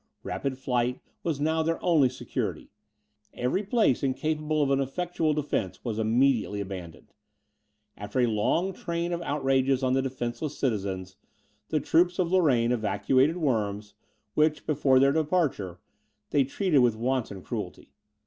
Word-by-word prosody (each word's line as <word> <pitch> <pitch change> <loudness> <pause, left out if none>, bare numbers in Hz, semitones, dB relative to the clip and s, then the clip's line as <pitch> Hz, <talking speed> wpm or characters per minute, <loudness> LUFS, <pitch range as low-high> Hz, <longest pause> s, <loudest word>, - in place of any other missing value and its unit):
Rapid 135 -2 -3
flight 125 -1 -1 0.2
was 160 -5 -2
now 160 +2 +1
their 165 +1 0
only 155 -7 +4
security; 130 - -4 0.6
every 125 +10 0
place 210 - +2
incapable 150 +3 0
of 140 - 0
an 135 - +3
effectual 160 +2 -1
defence 140 -10 -2
was 110 -2 -2
immediately 115 -2 +2
abandoned. 95 -4 -8 0.8
After 105 +5 -4
a 125 - +5
long 120 - +1
train 170 0 -3
of 170 - -3
outrages 135 -3 +1
on 130 0 +2
the 135 - +2
defenceless 130 +2 -4
citizens, 95 -6 -2 0.5
the 155 - +1
troops 175 +5 +2
of 180 -2 0
Lorraine 135 -11 +3
evacuated 130 +6 +2
Worms, 105 - -1 0.4
which, 150 +2 +2
before 140 -3 +3
their 135 +1 +5
departure, 150 - 0 0.5
they 140 -2 +3
treated 160 +2 +1
with 120 -3 +4
wanton 115 -5 -2
cruelty. - - -6
135 Hz, 140 wpm, -27 LUFS, 120-155 Hz, 0.8 s, a